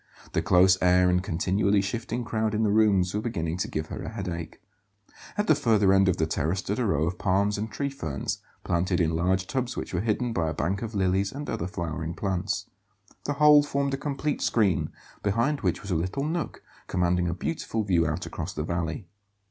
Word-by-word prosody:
The 80 - +2
close 95 +1 +5
air 90 0 +5
and 90 0 +2
continually 95 +4 +1
shifting 115 +4 -2
crowd 110 -1 -1
in 110 - +1
the 105 - +2
rooms 100 -4 +3
were 105 - -1
beginning 85 -7 -2
to 90 - -1
give 75 0 -4
her - - -5
a - - -5
headache. 85 -2 -5 0.8
At 210 - +1
the 155 - +5
further 110 -9 +3
end 95 0 +5
of 90 - +1
the 80 - +2
terrace 80 +3 -1
stood 100 +4 -2
a 125 - +1
row 80 -6 +1
of 90 +1 -3
palms 100 +1 +2
and 110 +2 -3
tree 140 +5 -2
ferns, 80 - -3 0.2
planted 90 +1 0
in 80 -2 +2
large 90 +2 +1
tubs 125 +3 -2
which - - -5
were 85 - 0
hidden 115 +2 0
by 80 -5 0
a 80 - -4
bank 95 +6 -1
of 115 -2 -5
lilies 95 +1 +1
and 145 +1 -6
other 85 - -2
flowering 85 -3 -4
plants. 95 0 -2 0.6
The 145 - 0
whole 150 0 +7
formed 140 -1 -1
a - - 0
complete 145 +1 -2
screen, 100 -9 +2 0.3
behind 120 +8 +1
which - - -1
was 100 - -5
a - - +2
little 90 +12 -1
nook 160 +2 -3 0.2
commanding 90 -1 +1
a 85 - -1
beautiful 110 - -2
view 85 -5 +2
out 75 0 -2
across - - -5
the 75 - -2
valley. 85 +3 -3
95 Hz, 210 wpm, -27 LUFS, 85-115 Hz, 0.8 s, whole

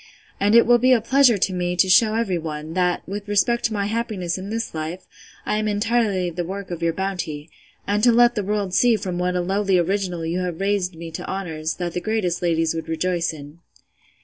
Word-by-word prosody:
and 205 +3 +3
it 235 - +7
will 240 0 +5
be 255 +2 +3
a 245 - +4
pleasure 250 0 +4
to 190 0 0
me 180 0 -1
to 190 - +3
shew 215 +4 +5
every 200 -6 0
one, 155 0 -6
that, 180 0 0
with 200 +2 -6
respect 205 +4 +1
to 230 - +1
my 200 -2 -1
happiness 210 -6 -2
in 190 +1 -6
this 225 +1 -3
life, 160 +3 -5 0.4
I 210 - 0
am 215 - -1
entirely 210 -3 0
the 175 +1 -3
work 195 +2 -6
of 170 -1 -5
your 170 0 +2
bounty; 165 -4 -4 0.3
and 205 +1 0
to 240 - +6
let 240 +1 +5
the 210 -3 -2
world 200 -2 -2
see 240 +3 +4
from 185 -4 -4
what 180 0 0
a 180 - +1
lowly 195 +1 +1
original 180 -1 -1
you 170 +3 -1
have 180 -3 -3
raised 195 -3 0
me 165 0 -8
to 160 - -7
honours, 160 -5 -3
that 175 -2 -4
the 180 - -3
greatest 205 -4 -1
ladies 165 -2 +1
would 165 0 -5
rejoice 170 +1 -1
in. 150 +1 -11
185 Hz, 225 wpm, -22 LUFS, 170-210 Hz, 0.4 s, it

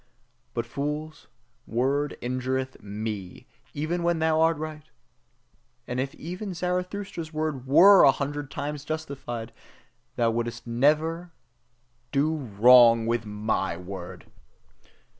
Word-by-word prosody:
But 115 -1 -1
thy - - -21
fools' 150 +2 -4 0.4
word 135 +5 0
injureth 130 +1 -2
ME, 105 -2 -6 0.3
even 155 +4 -2
when 170 0 +1
thou 160 0 +2
art 165 0 +3
right! 155 0 -6 1.1
And 125 0 -3
even 175 +9 -5
if - - -9
Zarathustra's 180 -1 -3
word 155 -5 -3
WERE 190 +8 +8
a 135 - +8
hundred 145 0 -4
times 145 0 -5
justified, 140 -7 -5 0.6
thou 115 -1 +2
wouldst 120 +1 -4
ever 155 +8 +1 0.8
DO 150 +3 +1
wrong 120 -2 +6
with 115 -1 -1
my 105 -4 -1
word! 90 0 -8
140 Hz, 115 wpm, -26 LUFS, 120-155 Hz, 1.1 s, WERE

